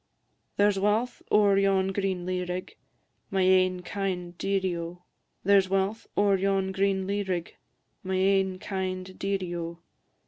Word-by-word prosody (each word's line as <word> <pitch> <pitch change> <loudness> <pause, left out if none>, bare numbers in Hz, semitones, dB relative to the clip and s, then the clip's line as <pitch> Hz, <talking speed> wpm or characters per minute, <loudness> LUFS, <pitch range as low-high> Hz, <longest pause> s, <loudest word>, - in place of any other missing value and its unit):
There 205 +1 +5
's 195 - -3
walth 215 +5 0
ower 200 -2 +5
yon 195 -1 +2
green 190 -2 -2
lea 180 0 -1
rig, 180 +1 -5 0.5
My 190 -1 +1
ain 185 -1 +3
kind 180 -2 -3
dearie, 190 -1 0
O! 170 +1 -6 0.4
There 200 +1 +6
's 190 - -8
walth 195 +3 0
ower 200 -1 +4
yon 195 0 +1
green 190 0 +1
lea 200 +1 -1
rig, 180 -4 -3 0.5
My 190 0 -2
ain 190 0 +2
kind 185 -1 -4
dearie, 195 -3 -2
O! 170 0 -5
190 Hz, 150 wpm, -27 LUFS, 185-195 Hz, 0.5 s, There